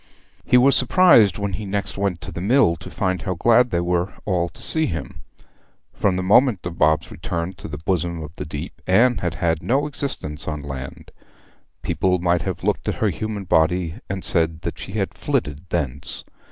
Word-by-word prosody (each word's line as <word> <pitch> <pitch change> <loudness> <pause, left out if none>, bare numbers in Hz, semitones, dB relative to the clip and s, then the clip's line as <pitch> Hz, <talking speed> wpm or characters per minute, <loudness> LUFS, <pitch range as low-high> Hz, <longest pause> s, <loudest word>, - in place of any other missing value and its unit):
He 125 - +4
was 135 +2 +5
surprised 125 - +5
when 100 -2 -3
he 105 +4 -4
next 100 +1 -3
went 95 -4 -2
to - - -7
the 85 - -6
mill 110 -3 +3
to 85 - -10
find 95 -2 -1
how 95 -3 -3
glad 120 +7 +4
they 90 - -1
all - - -3
were 90 +1 0 0.4
to 85 - -11
see 160 -1 +4
him. 80 -6 -6 0.7
From 95 -2 +1
the 95 - -2
moment 105 0 +4
of 85 -1 -6
Bob's 80 +1 +2
return 85 +1 -4
to 100 - -8
the 75 -2 -6
bosom 85 0 -2
of 75 - -8
the - - -5
deep 75 +3 -7
Anne 115 +4 +4
had 90 -3 -2
had 80 -2 0
no 135 +4 +1
existence 135 - -4
on 75 -2 -4
land; 70 -1 -8 0.7
people 90 -1 +1
might 85 -1 +1
have - - -4
looked - - 0
at - - -1
her - - +1
human 110 -2 -4
body 85 0 +2 0.2
and 95 -1 -4
said 80 -1 +1
she - - -9
had - - -2
flitted 75 +5 -3
thence. 70 -4 -3
90 Hz, 195 wpm, -22 LUFS, 80-105 Hz, 0.7 s, was